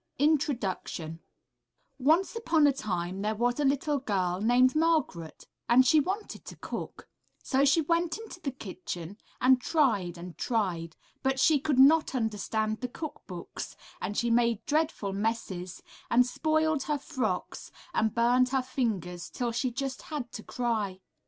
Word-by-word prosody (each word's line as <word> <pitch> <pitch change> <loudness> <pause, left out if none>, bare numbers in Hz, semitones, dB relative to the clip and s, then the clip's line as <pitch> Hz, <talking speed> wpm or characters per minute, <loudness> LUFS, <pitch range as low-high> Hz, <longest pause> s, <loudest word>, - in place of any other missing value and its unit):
INTRODUCTION 240 - 0 0.8
Once 320 - +3
upon 325 -9 +3
a 285 - +5
time 185 -6 -3
there 215 +1 0
was 245 +4 0
a - - +2
little 285 +1 +1
girl 190 -7 -1
named 250 +4 +4
Margaret, 310 - 0 0.2
and 250 +2 +6
she 310 +5 +6
wanted 390 +8 -3
to - - -9
cook, - - -7 0.4
so 270 +1 +2
she 285 +4 +4
went 335 +3 0
into 445 -5 -10
the 305 - -3
kitchen 185 -6 -7 0.2
and 255 0 +5
tried 220 - +1
and 175 0 -9
tried, 180 -8 -1 0.3
but 265 0 0
she 300 +2 +5
could 285 -1 0
not 285 +2 +6
understand 220 -1 -1
the 250 - -1
cook 310 +4 -7
books, 175 -3 -7 0.3
and 200 +3 -3
she 235 0 +1
made 235 -2 +2
dreadful 300 -10 0
messes, 195 -4 -3 0.3
and 245 +1 +5
spoiled 315 +3 +1
her 300 -1 0
frocks 235 -9 -3 0.2
and 220 -1 +1
burned 245 +2 +4
her 265 0 +1
fingers 195 - -2
till 240 -1 -2
she 250 +3 0
just 265 +2 -4
had 285 -6 -5
to - - -7
cry. 215 -6 -2
245 Hz, 150 wpm, -29 LUFS, 205-290 Hz, 0.8 s, and